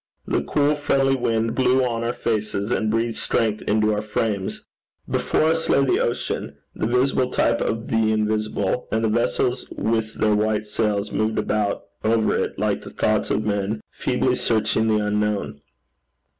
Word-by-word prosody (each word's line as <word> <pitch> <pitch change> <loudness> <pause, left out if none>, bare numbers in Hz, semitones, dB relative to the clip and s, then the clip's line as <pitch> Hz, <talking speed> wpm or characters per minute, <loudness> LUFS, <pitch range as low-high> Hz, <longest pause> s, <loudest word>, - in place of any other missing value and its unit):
The - - 0
cool 145 0 +1
friendly 135 -2 +2
wind 115 -2 0
blew 130 0 +3
on 115 -2 -2
our 120 - 0
faces, 110 -1 -2
and 110 -2 +1
breathed 115 +1 0
strength 110 -2 0
into 110 0 +2
our 105 - -1
frames. 105 -2 -2 0.4
Before - - +1
us 160 +1 +1
lay 140 - +4
the - - +2
ocean, 120 - -2 0.2
the 110 - -2
visible 125 +1 +2
type - - +1
of 115 +1 -2
the 110 -1 +2
invisible, 110 0 -1
and 110 +1 0
the - - +2
vessels 120 +2 0
with 110 -1 -1
their 105 0 +2
white 105 0 +1
sails 105 -1 -1
moved 110 +2 0
about 105 -1 0 0.2
over 110 0 +2
it - - -2
like - - 0
the - - -9
thoughts - - 0
of 105 +1 0
men 105 +1 -1
feebly 125 0 0
searching 110 -2 +1
the 105 -1 +2
unknown. 105 -7 -1
110 Hz, 165 wpm, -23 LUFS, 105-120 Hz, 0.4 s, lay